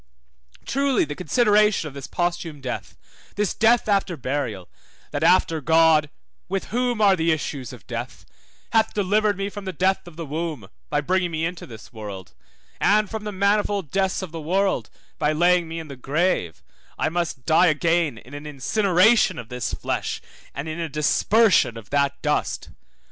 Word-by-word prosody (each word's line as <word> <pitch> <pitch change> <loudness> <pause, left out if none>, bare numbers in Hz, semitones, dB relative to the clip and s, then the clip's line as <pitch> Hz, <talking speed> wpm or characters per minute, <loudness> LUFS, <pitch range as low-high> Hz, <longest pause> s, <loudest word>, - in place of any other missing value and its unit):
Truly 275 -3 +1
the 150 - -5
consideration 210 - +2
of 145 - -9
this 140 -1 -8
posthume 170 -3 -2
death, 130 -2 -6 0.4
this 210 -2 0
death 230 +1 +3
after 195 -4 +1
burial, 130 -9 -3 0.4
that - - -3
after 160 -1 +3
God 160 -1 +4 0.4
(with 195 0 -3
whom 245 -1 0
are 200 -3 +5
the 165 -1 +1
issues 145 -4 -3
of 125 -4 -13
death) 115 -8 -6 0.5
hath 225 -1 +2
delivered 205 0 +2
me 195 0 -2
from 205 0 -8
the 190 - -3
death 185 +2 0
of 175 - -12
the 165 0 -6
womb, 155 - -4 0.2
by - - +1
bringing 180 +3 +1
me 160 0 -2
into 175 0 -5
the 115 -3 -10
world, 100 - -8 0.5
and 210 0 +3
from 220 -1 -5
the 210 - -3
manifold 200 -3 0
deaths 190 0 0
of 180 - -7
the 165 -1 -6
world, 180 - 0 0.3
by 150 0 +2
laying 175 +1 +3
me 165 +1 -6
in 160 - -8
the 140 - -8
grave, 135 - -1 0.3
I - - +1
must 165 -6 -3
die 165 +3 +5
again 165 -3 +1
in 125 +6 -14
an 145 +1 -7
incineration 190 - +3
of 115 -2 -8
this 125 -1 -3
flesh, - - -3 0.4
and 140 +3 -4
in 155 +1 -5
a 165 -1 -3
dispersion 150 - +3
of 110 -3 -12
that 140 -1 +1
dust. - - -1
165 Hz, 175 wpm, -23 LUFS, 145-195 Hz, 0.5 s, are